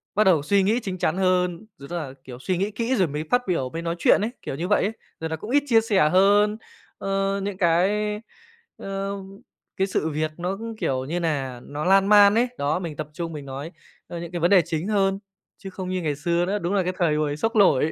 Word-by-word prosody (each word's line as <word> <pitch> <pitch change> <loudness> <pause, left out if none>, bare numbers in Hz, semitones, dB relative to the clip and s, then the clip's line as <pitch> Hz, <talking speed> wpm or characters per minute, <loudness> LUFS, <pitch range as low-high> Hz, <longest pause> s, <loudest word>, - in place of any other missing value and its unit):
bắt 215 - +4
đầu 180 -7 +4
suy 200 +5 +3
nghĩ 215 +5 +2
chính 190 -5 -5
chắn 180 - 0
hơn, 185 0 +1
rồi 140 - -11
tức 175 - -4
là, 145 -6 -5
kiểu, 125 -2 -10
suy 185 +6 -1
nghĩ 200 +4 -1
kỹ 230 +4 -1
rồi 185 -6 +2
mới 150 +1 -4
phát 245 - +4
biểu, 165 -8 0
mới 165 +5 -5
nói 170 0 -2
chuyện - - +4
ấy, 220 +3 -1
kiểu - - -5
như 170 +5 -3
vậy 205 - +3
ấy. 205 - 0 0.3
Rồi 160 - -3
nà 160 - -2
cũng 210 +8 -9
ít 285 +2 +3
chia 230 -4 +5
sẻ 200 -8 +3
hơn, 205 +4 +4 0.4
ơ, 195 0 -1
những 200 -1 -4
cái, 205 +4 +1 0.6
ơ, 195 0 -4 0.6
cái 190 +1 +1
sự 160 -4 -1
việc 155 +1 -2
nó 180 +3 -3
cũng, 225 +1 -6
kiểu 130 -9 -1
như 170 +6 -2
nà, 140 -7 -2
nó 150 +2 -5
lan 195 +1 +4
man 205 0 +7
ấy. 240 +2 +3
Đó, 145 +4 0
mình 165 -5 -5
tập 155 -1 -5
trung 165 +1 -5
mình 145 -2 -7
nói, 140 +4 -6 0.4
ơ, 170 - -6
những 170 0 -7
cái 175 - -3
vấn 175 - +3
đề 190 -3 +7
chính 160 +4 -3
hơn, 195 -2 +1 0.4
chứ 195 - -8
không 185 -1 -6
như 185 0 -2
ngày 150 -3 -1
xưa 170 +4 0
nữa. 200 +3 -1
Đúng 175 +1 -2
là 195 -2 +2
cái 180 +1 -2
thời 165 -4 +2
hồi 150 -1 -1
xốc 225 +7 -1
nổi, 160 -7 +4
185 Hz, 250 wpm, -24 LUFS, 160-200 Hz, 0.6 s, man